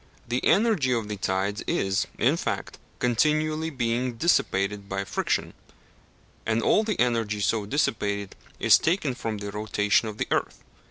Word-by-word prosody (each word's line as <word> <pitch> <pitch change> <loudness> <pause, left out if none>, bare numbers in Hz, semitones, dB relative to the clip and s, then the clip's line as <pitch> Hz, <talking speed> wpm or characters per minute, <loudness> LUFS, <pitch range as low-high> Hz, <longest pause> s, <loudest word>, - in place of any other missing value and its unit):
The 120 +2 -1
energy 205 - +3
of 115 -3 -2
the 105 - -2
tides 95 +2 -1
is, 95 0 0
in - - +3
fact, - - -4 0.2
continually 155 +6 +1
being 125 -2 -1
dissipated 105 - 0
by 95 0 -2
friction, - - -2 0.9
and 110 +1 0
all 215 - +4
the 215 -3 -2
energy 115 -4 +1
so 105 +1 0
dissipated 100 -6 -1 0.2
is - - +6
taken 160 -5 0
from 110 -3 -4
the 100 0 -6
rotation 105 +1 +1
of 105 -1 -6
the - - -2
earth. - - -1
115 Hz, 150 wpm, -26 LUFS, 100-135 Hz, 0.9 s, is